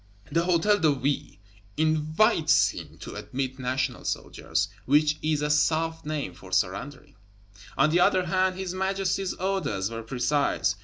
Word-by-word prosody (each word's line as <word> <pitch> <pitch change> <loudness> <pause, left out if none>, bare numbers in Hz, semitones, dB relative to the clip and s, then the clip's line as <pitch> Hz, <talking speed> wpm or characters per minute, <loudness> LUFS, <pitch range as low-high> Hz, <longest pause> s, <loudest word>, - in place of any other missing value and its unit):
The 165 - +2
Hôtel 180 +4 +2
de 155 -2 +5
Ville 135 +2 -2 0.4
"invites" 155 +2 +3
him - - -9
to - - -7
admit 130 0 -4
National 130 +1 -2
Soldiers, - - -2 0.2
which 150 +2 +3
is 155 -1 0
a 150 - +1
soft 160 +1 +1
name 150 -11 -3
for 95 +1 -14
surrendering. 95 +9 -2 0.6
On 150 +3 +4
the 175 - +3
other 185 +1 +3
hand, 185 +1 +1
his 190 -2 -4
Majesty's 190 0 -1
orders 175 - -1
were 115 0 -5
precise. 135 +5 0
155 Hz, 145 wpm, -26 LUFS, 135-180 Hz, 0.6 s, de